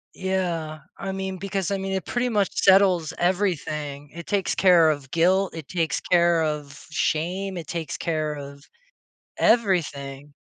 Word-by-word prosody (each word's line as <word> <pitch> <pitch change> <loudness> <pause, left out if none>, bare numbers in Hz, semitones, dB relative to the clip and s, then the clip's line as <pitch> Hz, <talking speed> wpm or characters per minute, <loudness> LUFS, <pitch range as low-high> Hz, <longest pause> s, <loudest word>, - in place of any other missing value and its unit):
Yeah, 175 -5 -2 0.2
I 195 - -4
mean, 190 0 -4
because 195 -1 -3
I 200 - 0
mean, 195 0 -4
it 190 -3 -2
pretty 245 +1 -1
much 205 -4 +1
settles 190 -4 +4
everything. 155 -6 -1
It 170 +1 -8
takes 200 -3 0
care 175 -4 +5
of 145 -3 -3
guilt. 185 +3 +2
It 160 -4 -7
takes 165 -3 -1
care 170 -1 +3
of 150 -2 -4
shame. 180 +5 -1
It 165 - -7
takes 165 -2 -4
care 155 -2 -1
of 140 0 -9 0.7
everything. 145 - +1
170 Hz, 150 wpm, -24 LUFS, 155-190 Hz, 0.7 s, care